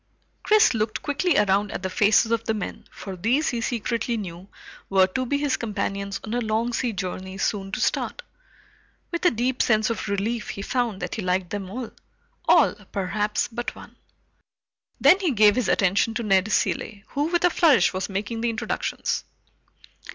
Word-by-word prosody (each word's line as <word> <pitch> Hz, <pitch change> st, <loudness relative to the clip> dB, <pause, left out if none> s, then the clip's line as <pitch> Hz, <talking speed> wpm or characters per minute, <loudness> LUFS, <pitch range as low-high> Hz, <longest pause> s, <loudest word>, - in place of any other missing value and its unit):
Chris 430 Hz, -7 st, +5 dB
looked 215 Hz, -1 st, -2 dB
quickly 300 Hz, +3 st, +1 dB
around 205 Hz, 0 st, +2 dB
at -, -, -5 dB
the -, -, 0 dB
faces 220 Hz, +1 st, +3 dB
of 230 Hz, -1 st, +1 dB
the 220 Hz, -, 0 dB
men, 210 Hz, -, -6 dB
for 195 Hz, -2 st, -8 dB
these, 240 Hz, -, +1 dB
he 235 Hz, -2 st, -2 dB
secretly 235 Hz, +1 st, -1 dB
knew, 180 Hz, -2 st, -7 dB, 0.4 s
were 190 Hz, -1 st, +5 dB
to 255 Hz, +7 st, -3 dB
be 285 Hz, -, +1 dB
his 285 Hz, -2 st, 0 dB
companions 200 Hz, -2 st, -3 dB
on 215 Hz, -, -5 dB
a 245 Hz, -, 0 dB
long 225 Hz, +2 st, -1 dB
sea 240 Hz, 0 st, 0 dB
journey 190 Hz, -1 st, -5 dB
soon 195 Hz, -1 st, -2 dB
to -, -, -3 dB
start. -, -, -1 dB, 0.9 s
With 340 Hz, -, -3 dB
a -, -, +8 dB
deep 245 Hz, +3 st, -1 dB
sense 215 Hz, 0 st, +2 dB
of 220 Hz, -, -4 dB
relief 210 Hz, +3 st, -2 dB
he 200 Hz, -, -5 dB
found 235 Hz, -4 st, -1 dB
that -, -, -4 dB
he 220 Hz, -, -3 dB
liked 180 Hz, -1 st, -1 dB
them 195 Hz, -2 st, -4 dB
all. 240 Hz, +3 st, -6 dB, 0.6 s
All, -, -, +5 dB, 0.2 s
perhaps, 205 Hz, +2 st, -1 dB
but 240 Hz, +1 st, -5 dB
one. -, -, -13 dB, 1.0 s
Then 380 Hz, -, +6 dB
he 370 Hz, -4 st, +1 dB
gave 210 Hz, -2 st, +5 dB
his 250 Hz, -2 st, 0 dB
attention 200 Hz, +4 st, +2 dB
to 240 Hz, -, -2 dB
Ned 195 Hz, 0 st, +2 dB
Cilley, 205 Hz, -1 st, -1 dB
who 285 Hz, +1 st, -1 dB
with 345 Hz, +2 st, 0 dB
a 355 Hz, -, +4 dB
flourish 290 Hz, -, +4 dB
was 185 Hz, +2 st, -3 dB
making 210 Hz, +4 st, -3 dB
the 235 Hz, -, +1 dB
introductions. 225 Hz, -1 st, -2 dB
220 Hz, 180 wpm, -24 LUFS, 195-245 Hz, 1.0 s, a